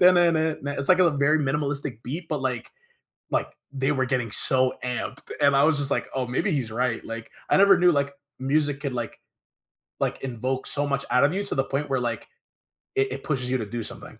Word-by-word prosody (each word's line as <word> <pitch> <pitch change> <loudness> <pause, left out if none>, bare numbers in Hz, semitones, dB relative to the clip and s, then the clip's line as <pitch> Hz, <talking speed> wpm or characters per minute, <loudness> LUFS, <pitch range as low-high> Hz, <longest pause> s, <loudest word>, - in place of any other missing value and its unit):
it's 160 -6 +3
like 185 - +6
a 175 -2 +5
very 145 +2 +3
minimalistic 140 -3 -2
beat 160 +6 -5
but 150 -3 -1
like 125 -2 -2 0.6
like - - 0 0.3
they 135 +1 +1
were 130 -2 +1
getting 125 -4 -1
so 130 +3 +1
amped 125 -1 -4
and 140 -1 +5
I 140 - +5
was 155 -2 +3
just 140 -1 -2
like, - - 0
"Oh 130 -1 -1
maybe 125 +11 0
he's 130 -8 -1
right," 120 +1 -1
like 115 0 -7 0.2
I - - +4
never 195 -1 +7
knew 180 0 +6
like 140 -1 0 0.3
music 140 +1 +1
could 140 -3 -3
like 120 -3 -4 0.8
like - - -1
invoke 130 +1 -2
so 145 0 -1
much 140 -1 -1
out 125 +2 +4
of 145 +4 +4
you 200 +1 -1
to - - -2
the 135 - +2
point 140 +2 -2
where 130 -1 +1
like 120 -2 -3 0.7
it 135 -1 +2
it 135 +1 -5
pushes 125 -5 -1
you 130 - +2
to 110 - -3
do 115 +3 -4
something. - - -9
140 Hz, 210 wpm, -25 LUFS, 125-150 Hz, 0.8 s, never